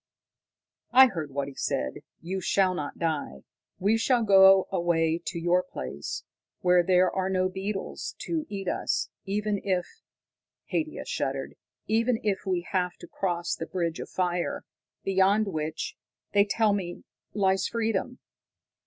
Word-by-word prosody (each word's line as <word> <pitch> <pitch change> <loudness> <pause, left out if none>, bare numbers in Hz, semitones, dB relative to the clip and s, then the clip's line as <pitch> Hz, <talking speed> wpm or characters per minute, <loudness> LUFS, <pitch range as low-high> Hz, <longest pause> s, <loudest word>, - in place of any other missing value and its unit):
_ - - -66 0.9
"I 260 +2 +9
heard 160 -8 -4
what 140 0 -3
he 140 - -8
said. 65 - -2 0.2
You 185 +3 -3
shall 185 +1 +2
not 150 -5 -5
die. 150 - -2 0.3
We 205 +4 +2
shall 240 0 +3
go 195 -2 +7
away 170 -2 +1
to - - -3
your 175 +2 +3
place, 70 - -6 0.4
where 180 0 +5
there 180 +1 +3
are 190 0 -1
no 185 -1 +1
beetles 195 +1 -4
to 320 -3 -2
eat 195 -2 -5
us, - - 0 0.2
even 205 +1 -1
if" 185 -3 0 0.9
Haidia 310 -1 -2
shuddered - - -2 0.3
"even 225 +2 +2
if 200 -2 -1
we 180 -2 +1
have 180 -2 0
to - - -11
cross 175 -2 -2
the 165 - -4
bridge 170 -3 -2
of - - -6
fire, 180 -1 -1 0.4
beyond 195 +2 +3
which, 155 -2 -3 0.4
they 200 0 +5
tell 215 0 +2
me, 180 -3 -4 0.3
lies 190 -2 +2
freedom." 230 +2 -1
190 Hz, 145 wpm, -27 LUFS, 170-205 Hz, 0.9 s, I